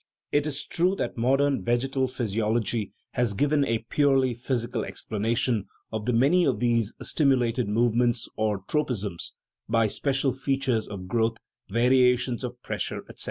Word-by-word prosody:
It 145 +1 +2
is 145 -1 -3
true 180 +3 +1
that - - -3
modern 135 +4 +2
vegetal 130 +3 0
physiology 110 -3 -1 0.2
has 120 -5 0
given 145 +5 +2
a 115 -4 -1
purely 135 -3 +3
physical 120 0 -2
explanation 110 0 -1 0.3
of 110 +1 -3
many 140 +10 +4
of 130 -9 +1
these 115 -2 +1
stimu 140 -4 +3
lated 120 -1 0
movements, 120 +2 +2
or 105 -3 -1
tropisms, 110 - -2 0.4
by 115 0 +3
special 135 +4 0
features 135 -4 -1
of 95 -3 -7
growth, 115 +2 +1 0.3
variations 125 +2 +3
of 125 0 -5
pressure, - - -3
etc. - - -13
120 Hz, 140 wpm, -26 LUFS, 110-135 Hz, 0.4 s, many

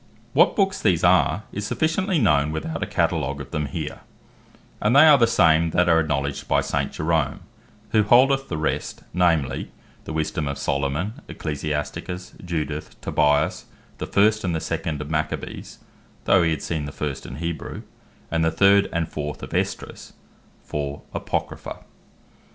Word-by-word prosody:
What - - +5
Books 195 -2 +1
these 90 -6 +2
are, 105 - +4
is 100 +1 -4
sufficiently 175 - 0
known, 75 - +3
without 80 +1 -4
a - - -1
Catalogue 70 +2 0
of 70 - -8
them 75 -3 -1
here; 65 - -5 0.8
and 105 +5 +2
they 145 +3 +9
are 150 -3 +7
the 115 - +5
same 80 -2 +4
that 90 0 +4
are 80 -1 +5
acknowledged 70 -3 -2
by - - +3
St. - - -1
Jerome, 80 -2 0 0.5
who 110 - +4
holdeth 135 +5 +4
the 80 - -2
rest, 80 - -2
namely, 85 -6 +1 0.4
the - - -6
Wisdome 75 -1 -1
of 70 - -3
Solomon, 75 - -2
Ecclesiasticus, 75 +4 -4
Judith, 80 -3 -4
Tobias, 75 0 +1 0.3
the - - -4
first 110 +2 +3
and 85 -4 0
second 75 -1 -3
of 75 +1 -6
Maccabees, 80 0 -3 0.5
(though 95 - +5
he 85 - +2
had 80 -3 -2
seen 80 -3 -2
the 70 - -6
first 70 -1 -4
in 65 - -7
Hebrew) 85 +2 -5 0.5
and 80 -1 +1
the 80 - +3
third 100 +4 +4
and 85 -1 -1
fourth 75 -1 -5
of - - -7
Esdras, - - -3 0.5
for 70 -1 -4
Apocrypha. - - -4
80 Hz, 155 wpm, -23 LUFS, 75-100 Hz, 0.8 s, they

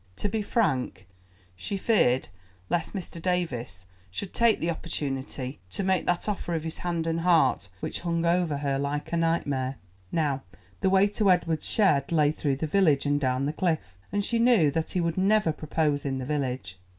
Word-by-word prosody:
To 205 - -2
be 215 +2 -1
frank, 185 - 0 0.5
she 195 - -4
feared 160 - +2 0.4
lest 170 +4 -1
Mr. 175 -3 -6
Davies 130 - -2 0.2
should 185 - -6
take 230 -2 +3
the 170 - 0
opportunity 135 -4 -4
to 195 - -3
make 190 -1 +1
that 175 +2 +1
offer 190 -4 -2
of 160 - -2
his 160 0 -5
hand 170 -2 -2
and 165 0 0
heart 165 - +3
which - - -3
hung 170 -1 -1
over 170 -3 +2
her 140 -1 -1
like 145 +3 -3
a - - +2
nightmare. 145 -6 0 0.4
Now 145 -5 0 0.4
the 190 - +2
way 190 +1 +5
to 205 0 +1
Edward's 170 -3 +2
shed 155 -10 +3
lay 150 -3 +4
through 145 -3 -1
the 140 - -3
village 155 -5 +3
and 145 0 +2
down 130 -1 0
the 150 - -1
cliff, 155 - -1 0.2
and 205 0 0
she 235 - +1
knew 230 - +5
that 160 +2 -2
he 185 - -1
would 170 +1 -1
never 200 -2 +3
propose 150 -1 -1
in 135 -1 -2
the 130 - -4
village. 130 -9 -3
160 Hz, 185 wpm, -27 LUFS, 140-180 Hz, 0.5 s, way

